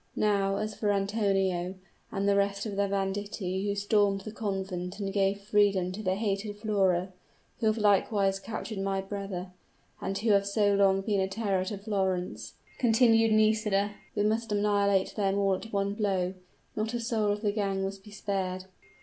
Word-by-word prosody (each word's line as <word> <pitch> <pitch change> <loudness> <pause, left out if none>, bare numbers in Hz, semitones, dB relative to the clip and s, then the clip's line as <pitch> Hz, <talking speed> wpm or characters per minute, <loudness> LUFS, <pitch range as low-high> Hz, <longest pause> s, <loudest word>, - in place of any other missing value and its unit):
"Now, 200 -2 +2
as 215 +1 -2
for 210 0 0
Antonio, 195 -3 0 0.4
and 200 0 -1
the 200 - +4
rest 200 +1 0
of 210 -2 -4
the 200 0 +1
banditti 195 0 -2
who 200 - 0
stormed 205 -1 +2
the 215 - -7
convent 190 -3 -4
and 195 -1 -3
gave 200 0 +1
freedom 200 -3 +2
to 200 +3 -6
the 185 -2 0
hated 205 0 -2
Flora 190 -4 +1 0.5
who 220 - +1
have 215 +1 +2
likewise 200 -1 +2
captured 215 +1 -5
my 195 0 -1
brother 195 -2 -5 0.5
and 195 +1 -2
who 220 +1 +1
have 200 -1 +3
so 205 0 +2
long 195 -1 +4
been 200 0 0
a 190 - +1
terror 195 -2 -1
to 200 +2 -4
Florence," 190 -3 -2 0.3
continued 225 -2 +4
Nisida; 215 -2 +2 0.2
"we 205 - +1
must 220 +1 0
annihilate 205 -2 +2
them 200 -2 +1
all 195 -1 +2
at 220 +4 -5
one 200 0 0
blow; 190 -4 0 0.4
not 220 +2 -2
a - - -1
soul 225 -3 0
of 205 0 -2
the 205 - +2
gang 195 -2 -1
must 195 0 -5
be 210 - -13
spared!" 190 -2 -3
200 Hz, 175 wpm, -29 LUFS, 195-210 Hz, 0.5 s, the